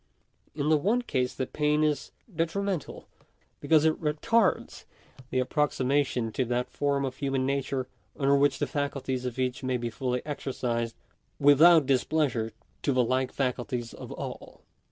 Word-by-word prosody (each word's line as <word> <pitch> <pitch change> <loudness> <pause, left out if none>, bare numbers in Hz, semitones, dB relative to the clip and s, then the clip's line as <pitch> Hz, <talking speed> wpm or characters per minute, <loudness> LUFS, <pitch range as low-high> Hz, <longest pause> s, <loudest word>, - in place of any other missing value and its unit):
In 150 0 -1
the 155 -1 +4
one 225 +10 +1
case 125 - -1
the 130 - -2
pain 150 +3 +1
is 150 -3 0 0.2
detrimental, 175 +1 -2 0.5
because 155 +1 +3
it 160 - +1
retards 190 +8 +1 0.4
the - - -2
approximation 130 -3 +1
to 130 - -1
that 125 +1 -2
form 140 -1 0
of 130 -1 -5
human 135 -2 -1
nature 135 -1 -1 0.3
under 140 0 +3
which 140 -1 +3
the - - 0
faculties 140 -4 -3
of 125 -1 -4
each 130 -1 -1
may 130 -1 0
be 120 -1 -4
fully 125 +2 -2
exercised 120 -5 -3 0.4
without 155 +3 +7
dis 130 -2 +2
pleasure 130 -8 0 0.3
to 145 - +1
the 130 -1 +3
like 130 +2 0
faculties 125 -2 -2
of - - -9
all. - - -8
135 Hz, 155 wpm, -28 LUFS, 125-150 Hz, 0.5 s, without